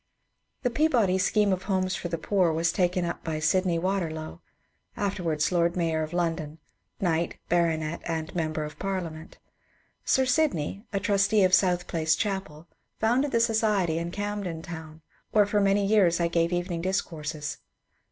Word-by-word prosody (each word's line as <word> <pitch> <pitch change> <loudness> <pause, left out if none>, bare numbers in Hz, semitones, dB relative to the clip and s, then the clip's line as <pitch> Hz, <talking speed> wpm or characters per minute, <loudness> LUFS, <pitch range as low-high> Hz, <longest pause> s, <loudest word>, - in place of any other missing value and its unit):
The 250 - +1
Peabody 235 -10 +2
scheme 205 +1 +2
of 185 0 -4
homes 185 -1 +1
for - - -4
the 170 -1 -2
poor 185 -2 +2
was 165 +1 +1
taken 180 -1 +1
up 170 - -4
by 160 -2 -2
Sydney 175 +3 +2
Waterlow, 165 - -3 0.3
— 85 +4 -38
afterwards 170 -6 -1
Lord 170 -1 +2
Mayor 165 -2 0
of 155 0 -4
London, 165 -3 -2 0.4
knight, 170 -2 0
baronet, 165 -2 +1
and 160 -1 -3
member 155 -2 -1
of 150 0 -8
Parliament. 170 -5 -4 0.7
Sir 265 - +3
Sydney, 250 - 0
a 200 - 0
trustee 200 +1 +3
of 185 0 +3
South 180 -2 +3
Place 160 -1 +1
chapel, 190 -6 -3 0.3
founded 245 +6 +2
the 230 - +2
society 215 -7 +2
in 170 +1 -3
Camden 200 -4 -4
Town, 160 -3 -9 0.3
where 210 -1 +5
for 205 0 +1
many 200 0 +3
years 195 -5 +4
I 170 - +2
gave 170 0 +1
evening 175 -1 -2
discourses. 155 -5 -3
175 Hz, 160 wpm, -27 LUFS, 160-200 Hz, 0.7 s, where